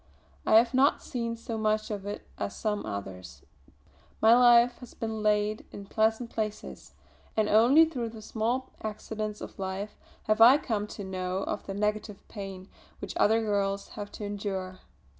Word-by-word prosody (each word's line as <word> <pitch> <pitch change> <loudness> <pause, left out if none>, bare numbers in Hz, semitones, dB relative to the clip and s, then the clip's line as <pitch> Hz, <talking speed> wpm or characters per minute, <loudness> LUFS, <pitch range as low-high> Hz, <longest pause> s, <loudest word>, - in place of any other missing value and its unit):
I - - +5
have 230 +2 +5
not 265 +2 +3
seen 235 -2 -3
so 230 -1 -5
much 215 0 0
of 200 -1 -5
it 205 - -6
as 200 - -3
some 210 -2 -2
others; 95 -3 -7 0.8
my 225 +2 +7
life 240 0 +6
has 250 - -12
been 220 -1 -4
laid 210 0 +1
in 200 - -9
pleasant 220 +3 0
places, 215 -1 -5 0.4
and 215 -1 +3
only 240 +10 +6
through 250 -8 -4
the 220 -1 -10
small 235 +5 -2
accidents 215 0 -5
of - - -9
life 195 +2 -4 0.3
have 215 +1 +1
I 245 +5 +9
come 215 -7 -2
to 210 - -8
know 185 0 -3
of - - -4
the 195 - -4
negative 210 0 -2
pain 195 -2 -7 0.3
which - - -7
other 225 +2 +4
girls 200 -2 -1
have 205 -1 -7
to - - -7
endure. 195 -2 -4
215 Hz, 165 wpm, -28 LUFS, 200-230 Hz, 0.8 s, I